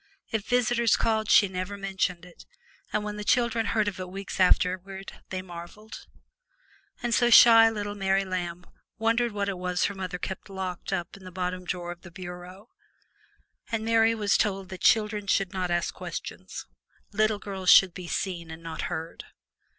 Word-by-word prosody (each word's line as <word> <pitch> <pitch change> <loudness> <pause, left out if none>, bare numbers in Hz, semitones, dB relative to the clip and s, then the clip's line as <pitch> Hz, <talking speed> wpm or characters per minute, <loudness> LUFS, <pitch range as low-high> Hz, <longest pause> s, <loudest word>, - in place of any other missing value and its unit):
If 220 -2 -2
visitors 240 -2 +3
called 220 -1 0
she 205 - +6
never 185 +2 -5
mentioned 190 -3 -2
it, 180 - -16 0.4
and 210 - 0
when 210 0 -5
the 210 - -5
children 235 0 +2
heard 215 -2 +1
of 195 -2 -3
it 185 -1 -5
weeks 195 +1 -7
afterward 185 +1 +1 0.2
they 185 -1 -4
marveled. 175 +4 -10 1.0
And 240 -1 0
so 240 0 +4
shy 230 -1 +9
little 205 -2 -4
Mary 195 -1 +1
Lamb 180 -1 -4 0.3
wondered 230 +1 +1
what 200 -1 -2
it 195 -2 -3
was 180 0 0
her 205 - -1
mother 185 -2 -5
kept 190 +3 -6
locked 190 -2 -5
up 175 -3 -3
in 195 - -14
the 185 - -9
bottom 180 0 -3
drawer 175 -1 -4
of 175 0 -10
the 180 - -12
bureau, 180 +4 -10 1.0
and 225 -1 -1
Mary 225 0 +4
was 210 -2 +2
told 195 -3 -1
that 185 - -8
children 210 -2 +3
must 195 -1 +1
not 185 -1 -2
ask 175 -1 0
questions - - -7 0.5
little 215 0 +2
girls 195 -3 -3
should 190 -3 +8
be 180 -1 -8
seen 170 -2 -3
and 160 +1 -9
not 165 -1 -5
heard. 165 -1 -6
195 Hz, 175 wpm, -27 LUFS, 180-215 Hz, 1.0 s, shy